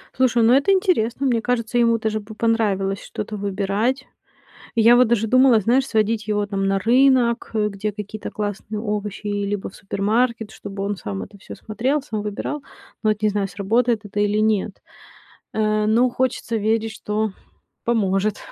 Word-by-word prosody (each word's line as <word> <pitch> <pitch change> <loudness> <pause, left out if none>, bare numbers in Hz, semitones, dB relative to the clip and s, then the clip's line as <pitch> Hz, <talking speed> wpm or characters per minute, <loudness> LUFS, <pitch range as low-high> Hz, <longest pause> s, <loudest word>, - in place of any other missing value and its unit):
Слушай, 250 -2 +3
ну 230 +2 +5
это 280 +9 +4
интересно. 280 - +1
Мне 240 -4 +2
кажется, 240 0 0
ему 230 -1 +4
даже 220 -1 -2
бы 215 +1 -11
понравилось 200 -4 0
что-то 215 0 -6
выбирать. 205 +6 -1 0.7
Я 230 +1 +6
вот 245 -2 +5
даже 225 -2 +2
думала, 255 0 +5
знаешь, 250 +6 +2
сводить 215 -1 0
его, 210 -1 0
там, 195 -1 -2
на 195 0 +2
рынок, 245 +1 +3
э, 210 -1 +1
где 210 +1 -4
какие-то 210 +1 -7
классные 210 0 -4
овощи, 210 -1 -4
либо 205 -1 -2
в - - -15
супермаркет, 220 +3 -1
чтобы 195 -2 -6
он 205 0 -2
сам 100 - -5
это 200 - -16
всё - - -10
смотрел, 255 +7 -1
сам 215 -7 -4
выбирал. 210 +8 -4 0.4
Но 215 - +3
вот 210 0 -2
не 215 - +4
знаю, 200 -1 -1
сработает 220 +4 0
это 205 0 -3
или 205 0 +1
нет. 215 -2 0 0.7
Э, 215 -1 +1
но 235 +4 +4
хочется 255 -2 -1
верить, 220 +1 0
что 215 -1 -2 0.5
поможет. 210 -3 +1
215 Hz, 170 wpm, -22 LUFS, 205-235 Hz, 0.7 s, Я